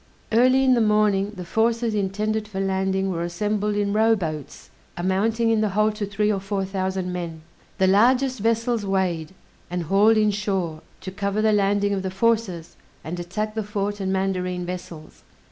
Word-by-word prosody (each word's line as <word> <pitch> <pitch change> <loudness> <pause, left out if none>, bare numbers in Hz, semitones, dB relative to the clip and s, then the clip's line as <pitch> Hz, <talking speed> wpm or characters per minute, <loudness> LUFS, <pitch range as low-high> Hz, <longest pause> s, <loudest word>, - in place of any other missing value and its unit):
Early 255 +4 +4
in 260 -1 +5
the 240 - +3
morning 210 -2 +2
the 180 -2 -7
forces 230 +3 +1
intended 210 +2 -1
for 200 -2 -5
landing 190 0 0
were 170 -2 -3
assembled 205 +4 -1
in 205 -1 0
rowboats, 195 - -1 0.3
amounting 215 +6 +1
in 220 -1 +2
the 215 - +1
whole 215 +2 +2
to 210 -1 -4
three 210 +1 0
or 195 - -1
four 195 0 -2
thousand 190 -1 -2
men. 165 -3 -5 0.3
The 190 - +3
largest 250 +6 +3
vessels 230 +1 0
weighed, 190 -3 -1 0.3
and 175 0 -2
hauled 205 +6 +4
in 215 -1 +3
shore, 190 -6 -2 0.2
to 185 - -6
cover 200 +2 -1
the 215 -1 +4
landing 200 0 +2
of 195 - -1
the 190 - -3
forces, 195 -4 -1 0.3
and 175 +2 -5
attack 210 +5 -3
the 220 - -2
fort 205 0 -3
and 190 -1 -2
mandarine 185 -2 -1
vessels. 175 -3 -8
200 Hz, 175 wpm, -23 LUFS, 185-215 Hz, 0.3 s, in